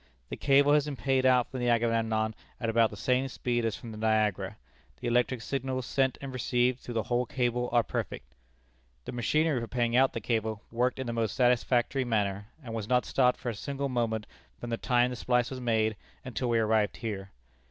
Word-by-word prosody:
The - - -4
cable 140 +1 +4
has 150 -1 +4
been 145 -2 -4
paid 130 0 +1
out 125 -2 +3
from 130 - -4
the 120 0 +1
Agamemnon 115 -2 +1 0.3
at 115 -2 -1
about 115 -1 +4
the 105 - -10
same 125 +6 +1
speed 120 -2 -1
as 115 - 0
from 115 - -9
the 110 - -8
Niagara. 105 -2 +1 0.4
The - - -4
electric 120 0 +1
signals 130 -1 -2
sent 130 -1 +1
and 135 -1 -6
received 125 0 +1
through 120 - -8
the 110 - +1
whole 120 0 0
cable 125 -1 0
are 120 -1 +4
perfect. 60 - -5 0.7
"The - - -5
machinery 145 +3 +1
for 115 - -4
paying 120 -1 0
out 130 +1 +4
the - - -2
cable 110 -1 -2
worked 125 +2 0
in 130 - -3
the 120 - -3
most 115 -2 -1
satisfactory 125 +1 +2
manner, 105 -4 -1 0.2
and 115 -3 -7
was 110 -2 -4
not 125 -1 +3
stopped 125 -2 +2
for 125 - -3
a - - -2
single 140 +5 -3
moment 115 -4 -1 0.3
from 120 - -6
the 115 - 0
time 125 +1 +2
the - - -4
splice 125 +1 +1
was 130 -1 -5
made 110 -2 +1 0.3
until 125 0 -2
we 115 - +3
arrived 110 -1 +2
here. 100 -4 -5
120 Hz, 210 wpm, -29 LUFS, 110-130 Hz, 0.7 s, cable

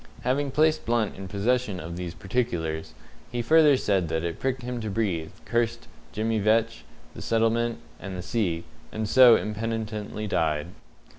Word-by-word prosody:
Having 140 +3 0
placed 155 +3 +2
Blunt 115 -3 0
in 95 0 -7
possession 105 +1 0
of 85 +1 -6
these 85 -1 -5
particulars, 85 -5 -2 0.4
he 120 0 -2
further 150 +1 +6
said 95 -7 +1
that 80 0 -1
it 85 -1 -3
pricked 130 -1 -2
him 125 -1 -4
to 110 - -3
breathe, 95 -7 -1 0.2
cursed 115 0 -1 0.2
Jemmy 110 +1 0
Vetch, 110 +2 +1 0.3
the - - -9
settlement, 115 +1 +1 0.2
and 95 -2 -6
the 90 - -5
sea, 90 -7 -1 0.3
and 110 0 -3
so 125 0 +8
impenitently 110 -1 -3
died. 80 -4 0
110 Hz, 155 wpm, -26 LUFS, 90-120 Hz, 0.4 s, so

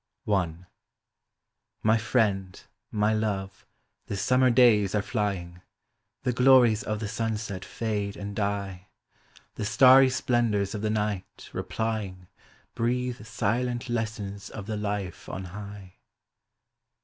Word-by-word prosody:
;|Y 90 -6 0 1.4
friend, 105 -5 0 0.3
my 105 0 +1
love, 100 -3 -3 0.4
the 100 - -3
summer 130 +5 +3
days 115 -5 +5
are 105 - +2
flying; 95 -6 -3 0.6
The 125 - +1
glories 125 -3 +5
of 105 0 -3
the 110 - -3
sunset 110 -4 -3
fade 105 -3 -3
and 100 0 -6
die; 100 -2 -3 0.7
The - - -4
starry 130 +3 +7
splendors 120 -6 +1
of 105 - -4
the 110 - 0
night, 105 -3 -3
replying, 95 -1 -3 0.5
Breathe 125 -1 -1
silent 120 +2 -1
lessons 110 -4 -3
of 100 - -7
the 110 0 -3
life 100 -4 -4
on 95 - -5
high. 100 -2 -9
105 Hz, 115 wpm, -27 LUFS, 100-115 Hz, 1.4 s, starry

